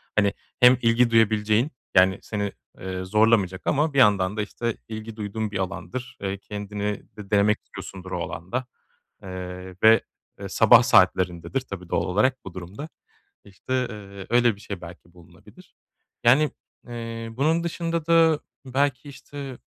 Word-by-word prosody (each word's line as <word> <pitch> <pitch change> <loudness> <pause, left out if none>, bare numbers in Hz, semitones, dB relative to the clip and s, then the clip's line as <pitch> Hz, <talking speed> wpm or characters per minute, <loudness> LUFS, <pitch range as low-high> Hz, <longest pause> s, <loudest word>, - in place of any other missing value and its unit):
Hani, 100 -2 +3 0.3
hem 125 +1 +7
ilgi 115 +1 +3
duyabileceğin, 110 +3 +3 0.2
yani, 95 +1 +5
seni, 100 -2 -3 0.3
eee, 95 0 -5
zorlamayacak 100 -2 +2
ama 150 +1 +1
bir 140 - +2
yandan 100 -4 +4
da, - - +1
işte, 115 +2 -3
ilgi 110 0 -7
duyduğun 105 0 -4
bir 100 - -3
alandır, 125 +6 -5
eee, 100 0 -2
kendini 105 +1 -5
de 105 -2 -9
denemek 105 +1 +4
istiyorsundur 95 -1 -10
o 90 - -2
alanda, 95 +9 -4 0.6
eee, 90 0 -7
ve, 110 +1 +7 0.4
eee, - - -6
sabah - - +6
saatlerindedir, 85 +4 +2
tabii 95 -8 -9
doğal - - +1
olarak 130 +8 +1
bu 95 - -8
durumda. 95 - -8 0.6
İşte, 125 +6 -3
eee, 100 -3 -9
öyle 120 -1 +4
bir - - -18
şey 100 -3 -7
belki 85 0 -12
bulunabilir. 85 -1 -18 0.5
Yani, 140 +6 +5 0.4
eee, 115 -1 -6
bunun 155 +7 +1
dışında 170 -1 -2
da 165 -2 +4 0.2
belki, 135 +2 -1
işte, 140 -1 -9
105 Hz, 145 wpm, -24 LUFS, 95-125 Hz, 0.6 s, hem